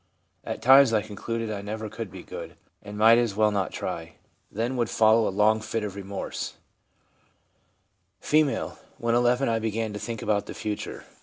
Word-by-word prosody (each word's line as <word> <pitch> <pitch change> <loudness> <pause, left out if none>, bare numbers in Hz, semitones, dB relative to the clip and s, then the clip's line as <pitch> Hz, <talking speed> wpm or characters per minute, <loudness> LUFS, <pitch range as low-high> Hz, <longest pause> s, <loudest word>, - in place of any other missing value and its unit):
At - - -5
times 135 -1 +7
I 105 -2 +2
concluded 110 +1 -4
I 100 -2 -4
never 110 +2 -5
could 105 0 -6
be 90 0 -10
good, - - -8 0.3
and 105 0 -9
might 115 +2 +7
as 115 -5 0
well 105 0 +3
not 100 -2 -1
try; - - -5 0.4
then 115 +5 -2
would 120 -2 0
follow 110 0 +4
a - - +1
long 105 +3 +3
fit 110 0 -3
of 100 -2 -5
remorse/ 100 0 -5 1.6
F. - - -8 0.6
'When 115 0 0
11 120 +2 +3
I 115 -1 +1
began 110 -1 -2
to 105 - -5
think 115 -1 -5
about 105 -1 0
the - - -7
future. 105 -2 -5
110 Hz, 175 wpm, -26 LUFS, 105-115 Hz, 1.6 s, times